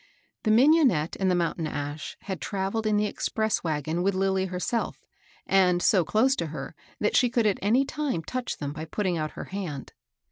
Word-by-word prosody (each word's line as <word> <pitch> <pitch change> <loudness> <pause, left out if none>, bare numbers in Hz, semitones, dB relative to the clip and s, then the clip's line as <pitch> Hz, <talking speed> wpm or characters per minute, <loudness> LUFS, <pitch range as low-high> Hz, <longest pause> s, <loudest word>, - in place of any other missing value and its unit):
The 215 - -1
mignonette 250 - +4
and 190 -1 +2
the 180 - +3
mountain 170 -2 -1
ash 145 +1 -5
had 190 -4 -5
travelled 200 +2 -2
in 210 -1 +2
the 210 0 +2
expresa 220 0 -1
wagon 155 +1 -1
with 195 +1 +1
Lilly 190 0 +1
herself, 185 +6 -3 0.4
and 185 -2 +4
so 180 0 +4
close 220 +10 +2
to 170 - -2
her 150 -2 -6 0.3
that 210 - +1
she 245 - +4
could 235 -1 +1
at 205 -2 +2
any 235 +7 +3
time 275 - -2
touch 255 +7 -4
them 145 -1 -4
by 155 +1 -6
putting 180 0 -1
out 155 0 -3
her - - -6
hand. 165 -9 -5
190 Hz, 190 wpm, -27 LUFS, 165-220 Hz, 0.4 s, mignonette